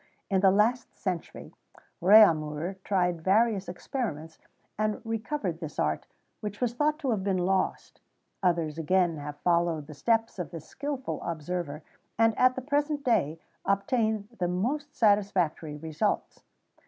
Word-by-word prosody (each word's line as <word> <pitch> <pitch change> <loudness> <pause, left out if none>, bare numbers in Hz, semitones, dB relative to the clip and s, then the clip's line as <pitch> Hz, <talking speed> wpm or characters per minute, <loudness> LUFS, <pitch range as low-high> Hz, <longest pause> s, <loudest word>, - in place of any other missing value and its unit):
[XVII - - -36
30] 195 - 0
In - - +2
the 195 0 +5
last 235 +3 +1
century, 180 -4 -5 0.5
Réaumur 170 -3 +5
tried 180 -4 +1
various 200 0 +2
experiments, 175 - -5 0.4
and 215 0 -1
recovered 225 - -3
this 160 -4 -7
art, 75 0 -1 0.3
which 210 -1 -6
was 245 -2 0
thought 300 +4 +1
to 280 -6 -1
have 205 -4 -1
been 195 -1 +1
lost; 185 +1 -1 0.4
others 165 -4 +1
again 175 0 +2
have 145 0 -6
followed 170 -3 +1
the 155 - -10
steps 225 +6 0
of 170 -4 -3
this 165 -2 -8
skilful 280 -2 -4
observer, 165 -2 -4 0.3
and, 225 -1 +4
at 255 0 +5
the 260 - -3
present 290 +1 0
day, 185 - +1 0.3
obtain 215 +1 0
the 180 - +1
most 255 +12 -1
satisfactory 190 -8 +1
results. 155 0 -2
190 Hz, 145 wpm, -28 LUFS, 165-225 Hz, 0.5 s, the